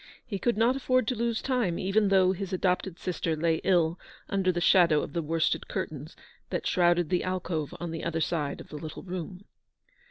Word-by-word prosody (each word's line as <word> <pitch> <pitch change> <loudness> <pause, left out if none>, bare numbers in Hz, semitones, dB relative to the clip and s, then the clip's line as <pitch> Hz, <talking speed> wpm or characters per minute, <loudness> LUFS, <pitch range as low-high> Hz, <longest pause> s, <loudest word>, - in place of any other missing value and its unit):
He 200 -5 -4
could 240 0 +1
not 235 +4 +3
afford 255 -3 +1
to 250 - 0
lose 235 0 -1
time, 245 -10 0
even 200 +2 +2
though 190 -1 +4
his 190 0 -4
adopted 180 -1 0
sister 170 -3 -2
lay 165 +1 +1
ill 170 -2 +2 0.3
under 190 -2 +2
the 175 - -2
shadow 170 -4 +5
of - - -7
the 170 - 0
worsted 165 +1 0
curtains 150 +1 -5 0.3
that - - -3
shrouded 175 -2 +3
the 180 - +1
alcove 180 -5 -3
on 170 -1 -4
the 165 - -5
other 165 -1 -1
side 155 -3 -1
of - - -11
the 150 - -7
little 155 0 -7
room. 185 +1 -6
180 Hz, 195 wpm, -28 LUFS, 165-195 Hz, 0.3 s, shadow